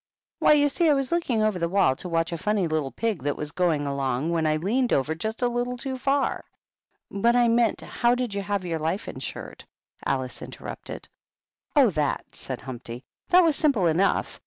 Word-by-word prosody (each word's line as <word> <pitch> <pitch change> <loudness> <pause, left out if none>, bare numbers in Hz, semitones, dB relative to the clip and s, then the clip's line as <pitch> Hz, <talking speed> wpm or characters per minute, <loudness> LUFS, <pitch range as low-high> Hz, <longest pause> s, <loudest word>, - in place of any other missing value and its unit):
" - - -68
Why, - - +6
you 290 -1 +4
see, 325 +3 +2
I 295 - +5
was 275 +1 -1
looking 265 -11 +1
over 215 -4 +1
the 170 0 0
wall 185 -8 +3
to 180 - -7
watch 165 0 0
a 170 - -2
funny 210 -1 +1
little 155 -4 -1
pig 220 - -2
that 145 +2 -2
was 150 -1 -4
going 165 -4 +1
along, 140 +2 -1
when 165 -2 +1
I 155 - +2
leaned 235 +10 0
over 140 +4 +1
just 220 +9 -4
a - - +4
little 245 +1 -2
too 265 +1 -4
far 275 +2 0 0.4
" - - -50
"But 235 +2 +4
I 240 -1 +4
meant 230 -1 +2
how 240 0 +1
did 250 -4 -2
you 200 - -2
have 200 -1 -2
your 165 -2 -2
life 165 +6 -2
insured?" 130 - -7 0.4
Alice 130 -2 -2
interrupted. - - -8 0.3
" - - -52
Oh, - - +6
that - - -1
/" - - -36
said - - -6
Humpty. 125 -1 -8
" - - -50
That 365 0 +7
was 320 -3 +3
simple 275 - +2
enough. 170 +4 +1
195 Hz, 220 wpm, -25 LUFS, 155-245 Hz, 0.4 s, That